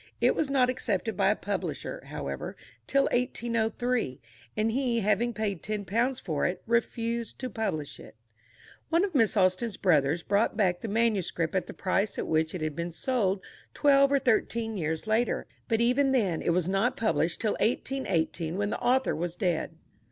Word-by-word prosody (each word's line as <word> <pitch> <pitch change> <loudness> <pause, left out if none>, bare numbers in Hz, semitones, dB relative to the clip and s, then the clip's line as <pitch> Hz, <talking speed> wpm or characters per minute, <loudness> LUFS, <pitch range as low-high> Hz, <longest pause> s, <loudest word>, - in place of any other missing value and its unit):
It - - +4
was 305 - -1
not 265 -2 +3
accepted 225 -4 -1
by 195 0 +3
a 210 - +3
publisher, 205 -1 -4
however, - - -5 0.3
till 275 0 +3
1803; 235 - 0 0.4
and 220 +1 +2
he, 240 -2 0
having 215 +4 +2
paid 210 -6 -2
ten 210 -1 -3
pounds 240 +6 0
for 155 -5 -2
it, 180 0 -4
refused 235 0 -1
to 255 -2 -5
publish 155 -10 -3
it. - - -13 0.7
One 335 +2 +3
of 385 - -6
Miss 225 -6 +3
Austen's 185 +3 +2
brothers 160 -2 +2
bought 205 +2 +1
back 180 -5 +2
the - - -4
manuscript 205 -7 0
at 185 -2 0
the - - -8
price 195 +2 0
at - - -2
which 160 +2 0
it 180 - -4
had 155 -1 -2
been 170 +1 -3
sold 200 -1 0 0.3
twelve 275 -1 +5
or 280 - +5
thirteen 230 -3 0
years 160 -3 -2
later; 220 +2 +1 0.2
but 225 0 +1
even 265 +3 +3
then 195 -10 +1
it - - -1
was 175 0 +1
not 225 +8 +1
published 175 - 0
till 215 -2 +1
1818, 180 -9 -1
when 205 +1 -1
the - - -2
author 260 +2 +2
was 175 +1 -3
dead. 175 -4 -1
215 Hz, 175 wpm, -28 LUFS, 180-240 Hz, 0.7 s, twelve